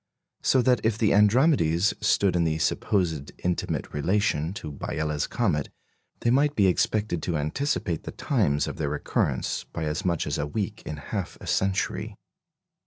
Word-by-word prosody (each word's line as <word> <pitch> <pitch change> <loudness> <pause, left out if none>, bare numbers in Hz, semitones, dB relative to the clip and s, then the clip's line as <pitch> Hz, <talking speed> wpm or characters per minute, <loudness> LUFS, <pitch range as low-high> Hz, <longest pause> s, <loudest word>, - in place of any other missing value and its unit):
So 130 -2 +3
that 125 0 +3
if 110 -1 +1
the 110 -2 +3
"Andromedes" 105 - +4
stood 95 -3 +3
in 85 - +3
the 80 -1 0
supposed 80 -3 0
intimate 90 -1 -2
relation 80 0 +1
to 75 -7 -6
Biela's 75 +1 -2
comet, 90 - 0 0.5
they 120 - +2
might 145 +3 +3
be 100 - +4
expected 95 -1 +1
to 85 -3 -1
anticipate 85 - -1
the - - -7
times 70 0 +1
of - - -5
their 75 -3 -1
recurrence 75 0 -1
by - - -6
as 75 +5 -2
much 85 -4 0
as 75 - -2
a 75 - -1
week 105 +5 -3
in 75 - -4
half - - -5
a - - -10
century. 95 0 -1
90 Hz, 165 wpm, -26 LUFS, 75-105 Hz, 0.5 s, Andromedes